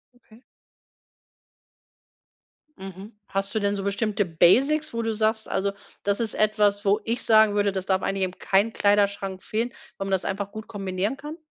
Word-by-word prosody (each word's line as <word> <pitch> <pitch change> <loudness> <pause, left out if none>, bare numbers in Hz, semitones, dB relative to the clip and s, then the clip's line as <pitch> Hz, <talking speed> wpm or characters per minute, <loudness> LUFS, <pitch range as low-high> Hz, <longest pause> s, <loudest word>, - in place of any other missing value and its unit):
Okay. 235 0 -21 2.4
Mhm. 195 +3 -9 0.2
Hast 195 0 -2
du 220 - +1
denn 200 0 0
so 195 - -4
bestimmte 205 +1 0
Basics, 255 - +3
wo 230 - -1
du 225 -1 -1
sagst: 220 0 0
„Also, 200 +1 0 0.3
das 200 0 0
ist 225 -2 0
etwas 210 -1 +2
wo 205 +2 +3
ich 230 +2 -1
sagen 220 -2 +5
würde, 205 -1 +2
das 190 -1 -4
darf 190 -1 +1
eigentlich 195 -1 -1
in 185 0 -3
keinem 200 +4 +1
Kleiderschrank 200 -2 +1
fehlen, 230 +3 -2 0.3
weil 195 - -4
man 195 - -4
das 190 - 0
einfach 200 +1 -3
gut 220 +1 -8
kombinieren 195 +3 -3
kann?" 300 +3 -8
205 Hz, 170 wpm, -25 LUFS, 195-220 Hz, 2.4 s, sagen